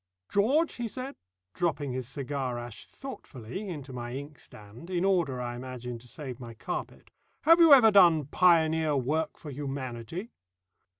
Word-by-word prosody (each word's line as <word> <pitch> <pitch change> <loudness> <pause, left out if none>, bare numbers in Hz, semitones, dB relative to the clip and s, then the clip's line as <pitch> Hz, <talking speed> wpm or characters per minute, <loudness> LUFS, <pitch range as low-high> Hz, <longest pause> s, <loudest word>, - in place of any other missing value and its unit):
"George," 275 +11 +2
he 240 -1 -2
said, 255 +4 -6 0.4
dropping 150 -5 -1
his 125 -1 -4
cigar 135 -2 -3
ash 120 -2 -8
thoughtfully 190 - -8
into 145 -6 -7
my 120 0 -5
inkstand, 135 - -10
in 180 0 0
order, 170 -10 +1
I 120 -1 -4
imagine, 125 -1 -6
to 125 - -14
save 130 -2 -7
my 120 -2 -9
carpet, - - -6 0.3
"have 330 +2 +7
you 330 -2 +7
ever 245 -6 +9
done 170 -7 +6
pioneer 160 -1 +3
work 150 +5 -1
for 150 - -9
Humanity?" 135 - -5
145 Hz, 145 wpm, -29 LUFS, 125-185 Hz, 0.4 s, ever